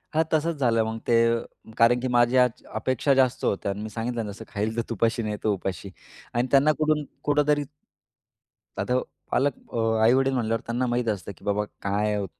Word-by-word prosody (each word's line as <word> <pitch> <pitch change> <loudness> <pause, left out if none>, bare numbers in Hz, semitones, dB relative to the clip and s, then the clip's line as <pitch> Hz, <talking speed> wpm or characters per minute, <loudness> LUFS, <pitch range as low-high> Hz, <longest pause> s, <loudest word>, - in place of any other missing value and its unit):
हां 160 - +4
तसंच 160 +1 +1
झालं 115 -3 +3
मग 110 0 -3
ते 120 - +3 0.2
अ, 115 -1 -7
कारण 120 +1 +5
की 130 - -1
माझ्या 120 +1 +5
आज 125 -2 -3
अपेक्षा 130 +5 +1
जास्त 130 -1 +2
होत्या 100 0 0
आणि 100 +1 -5
मी 110 - -5
सांगितलं 115 +2 -3
जसं 110 +2 -10
"खाईल 110 +2 -3
तर - - +2
तुपाशी 115 +1 0
नाही 105 -1 -2
तर 110 - +1
उपाशी" 95 -1 -3 0.4
आणि 120 +2 +1
त्यांना 140 +2 +5
कुठून 155 -1 +2 0.2
कुठेतरी. 145 0 +2 1.2
आता 125 +6 +1 0.3
पालक 140 0 +2 0.2
अ, - - -2 0.3
आई-वडील 135 +3 +4
म्हंटल्यावर 115 -2 0
त्यांना 120 +2 -1
माहीत 120 -1 -1
असतं 100 -1 -3
की - - -20
बाबा 105 +1 +1 0.2
काय 105 +1 0
आहे 100 -1 -1
115 Hz, 190 wpm, -25 LUFS, 110-130 Hz, 1.2 s, कारण